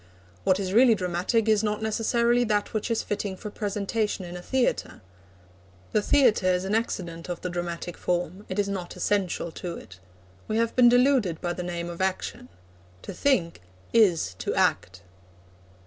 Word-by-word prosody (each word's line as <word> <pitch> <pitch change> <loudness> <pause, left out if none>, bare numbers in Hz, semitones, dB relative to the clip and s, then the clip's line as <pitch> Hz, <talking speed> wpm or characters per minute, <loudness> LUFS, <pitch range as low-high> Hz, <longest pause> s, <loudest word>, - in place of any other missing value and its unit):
What 185 +1 +3
is 190 -1 -2
really 235 +1 +6
dramatic 185 +5 0
is 215 -1 +3
not 210 0 -1
necessarily 235 +2 +2
that 210 -2 0
which 215 +2 -2
is 230 - 0
fitting 200 -2 -3
for 210 +1 -7
presentation 205 -1 -2
in 175 0 -8
a 180 - -6
theatre. 260 +6 -1 0.9
The 215 - +2
theatre 230 -5 +3
is 180 0 +1
an 195 - -2
accident 175 -7 -2
of 175 - -4
the 180 - -4
dramatic 175 0 -4
form. 180 +2 -2
It 185 - -4
is 205 -1 +1
not 190 -3 -5
essential 180 -2 -1
to 175 0 -6
it. 90 +1 -13 0.5
We 215 - -1
have 230 0 0
been 245 -1 +7
deluded 245 - +3
by 175 -1 -2
the 180 - -5
name 175 -1 -4
of 175 +1 -6
action. 190 +6 -2 0.5
To - - -7
think 175 - +1 0.3
is 180 - +3
to - - -2
act. 95 +1 0
195 Hz, 170 wpm, -26 LUFS, 175-225 Hz, 0.9 s, been